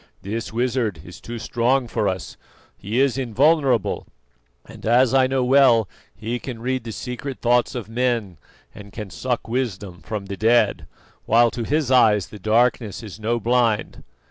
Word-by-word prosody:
"This 110 +4 -4
wizard 115 - -1
is 90 - -12
too 120 0 -7
strong 120 +3 0
for 105 - -1
us; 95 -1 -4 0.4
he 110 +6 -3
is 135 -1 +2
invulnerable, 135 - +1 0.6
and - - -13
as 125 +3 +3
I 130 -1 +4
know 130 -1 0
well 125 -4 +5 0.3
he 115 +4 -4
can 120 -2 -7
read 130 0 -2
the 115 - -5
secret 125 +4 -6
thoughts 120 +1 +2
of 120 -4 -5
men 115 -6 -1 0.4
and 100 -1 -12
can 105 -3 -7
suck 125 -3 -3
wisdom 105 -7 -3
from 105 -2 -5
the 100 0 -6
dead, 110 -8 +2 0.4
while 115 +1 +4
to 120 - -4
his 145 -1 0
eyes 105 -7 +4
the 105 - -11
darkness 115 +1 +1
is 105 -1 -9
no 115 +2 -1
blind." 115 -1 0
115 Hz, 165 wpm, -22 LUFS, 105-125 Hz, 0.6 s, well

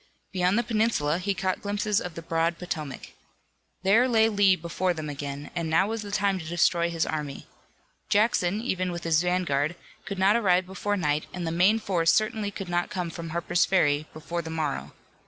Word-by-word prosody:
Beyond 185 +2 +2
the 235 - +2
peninsula 215 -9 +1
he 195 +2 -1
caught 185 0 -1
glimpses 205 0 0
of 180 -2 -6
the 165 - -7
broad 165 +1 0
Potomac. 155 -6 -6 0.7
There 220 +7 +5
lay 225 -2 +4
Lee 200 -3 +4
before 175 +1 -2
them 155 -2 -4
again, 140 0 -6
and 170 -2 -2
now 165 +4 +4
was 225 -1 -3
the 205 - -7
time 200 -2 +1
to 160 - -8
destroy 170 +1 +2
his 165 -1 0
army. 150 -3 -4 0.6
Jackson, 210 -2 +2
even 185 -6 -1
with 175 0 -5
his 165 -1 +3
vanguard, 175 -4 0 0.3
could 195 - -5
not 195 +3 +4
arrive 185 -5 +3
before 200 +2 -2
night, 150 -4 0
and 180 -1 -4
the 165 - -1
main 185 +6 +4
force 175 -6 +2
certainly 215 -1 +1
could 195 -1 -7
not 175 0 -1
come 180 -2 -3
from 165 0 -7
Harper's 170 +1 +1
Ferry 155 -5 +2
before 170 +2 -4
the 160 - -8
morrow. 155 -3 -3
180 Hz, 195 wpm, -26 LUFS, 165-200 Hz, 0.7 s, There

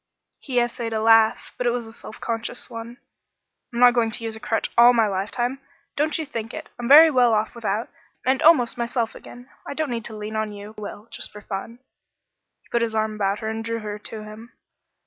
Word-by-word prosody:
He 255 -3 0
essayed 240 -1 -2
a 220 - 0
laugh, 225 0 +4
but 250 - 0
it - - +5
was 240 -1 -2
a 225 - -12
self 220 - -11
conscious 230 +2 -4
one. 230 +1 -8 0.7
"I'm 235 - -4
not 245 0 +8
going 235 -2 +2
to 230 - -5
use 225 -1 -4
a - - -9
crutch 225 -1 -1
all 240 +1 +8
my 230 -2 +4
lifetime; 215 +6 -2 0.4
don't 300 +1 +1
you 320 - -3
think 230 -5 -6
it. - - -8
I'm 240 - -3
very 310 +4 +9
well 250 -4 +4
off 215 +1 -1
without, 225 -1 -2 0.4
and 260 +1 +2
almost 275 -9 +5
myself 235 -1 -1
again. 245 +2 -13 0.2
I - - -5
don't 310 -3 -2
need 230 -2 -3
to 220 -2 -6
lean 210 +1 -6
on 215 -1 -2
you 205 +1 -9
but 210 -1 -6
I - - -9
will 210 - -17
just - - -6
for 210 - -11
fun." 205 +3 -6 0.9
He - - -28
put 235 - +1
his 225 -1 -1
arm 220 0 0
about 200 -1 -1
her 220 - -2
and 220 0 -4
drew 230 0 -3
her 210 0 -5
to 215 +1 -6
him. 215 +3 -11
230 Hz, 230 wpm, -23 LUFS, 215-245 Hz, 0.9 s, very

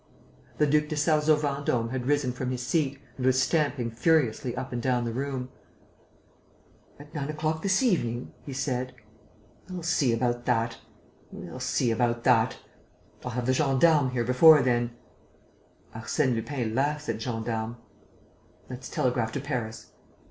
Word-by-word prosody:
The 150 - +4
Duc 150 +1 +2
de 155 - -3
Sarzeau 150 0 +3
Vendôme 140 -5 -1
had 130 -1 -3
risen 145 -3 +2
from 125 +1 -4
his 125 -1 -3
seat 140 -5 0 0.2
and 130 - -3
was 130 0 +4
stamping 140 -5 +1
furiously 125 -2 +1
up 130 0 -5
and 120 - -2
down 125 -1 +1
the 115 - -3
room: 130 0 -3 1.5
"At 145 +1 -14
nine 145 -1 -3
o'clock 155 +1 -2
this 195 +6 +2
evening?" 125 - 0
he 140 - -9
said. 130 -1 -2 0.7
"We'll 180 -2 -6
see 155 -6 +2
about 120 +1 0
that.... 115 -1 0 0.5
We'll - - -8
see 120 - +1
about 120 +1 0
that.... 125 0 +3 0.7
I'll - - -4
have 125 0 -2
the 130 - +2
gendarmes 140 0 +3
here 120 -2 0
before 140 +5 +7
then...." 120 -1 0 1.0
"Arsène 125 +4 0
Lupin 115 -1 -3
laughs 145 +4 0
at 110 - -2
gendarmes." 115 -1 -3 1.0
"Let's 130 +1 -7
telegraph 120 -3 0
to - - -2
Paris." 125 -5 -5
130 Hz, 150 wpm, -27 LUFS, 120-150 Hz, 1.5 s, before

